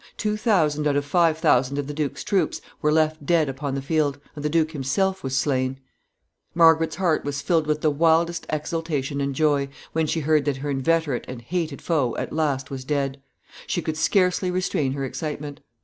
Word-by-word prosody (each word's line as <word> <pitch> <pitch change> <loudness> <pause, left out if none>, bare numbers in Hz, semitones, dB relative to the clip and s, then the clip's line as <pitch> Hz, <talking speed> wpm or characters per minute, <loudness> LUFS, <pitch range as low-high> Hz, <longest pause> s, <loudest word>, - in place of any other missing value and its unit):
Two 210 -1 0
thousand 160 -9 +2
out 145 - +1
of 145 0 0
five 165 +1 +3
thousand 135 -2 +2
of 145 - -1
the 145 - -5
duke's 145 -2 -3
troops 195 - 0 0.2
were 150 - +2
left 155 -1 +1
dead 160 0 +2
upon 135 +1 -3
the 135 - -3
field, 145 -1 +1 0.2
and 145 - -7
the 150 - +1
duke 160 0 +2
himself 190 +7 -1
was 135 0 -1
slain! 130 -1 0 0.8
Margaret's 165 -1 +5
heart 175 -4 +1
was 145 0 -3
filled 165 -4 +1
with 150 0 0
the 155 - +3
wildest 165 +2 +2
exultation 150 -2 -2
and 140 -1 -2
joy 145 -2 +2 0.2
when 160 -1 +1
she 160 - -1
heard 155 -1 +2
that 145 -2 0
her 145 +2 -3
inveterate 145 0 0
and 130 -1 -6
hated 155 +3 -3
foe 145 -8 +1
at - - -4
last 140 -4 -1
was 130 -1 -5
dead. 140 -1 -2 0.5
She 175 - -1
could 160 - -2
scarcely 180 +3 +2
restrain 180 -7 0
her 135 -1 -3
excitement. 145 +1 -5
150 Hz, 195 wpm, -24 LUFS, 140-165 Hz, 0.8 s, Margaret's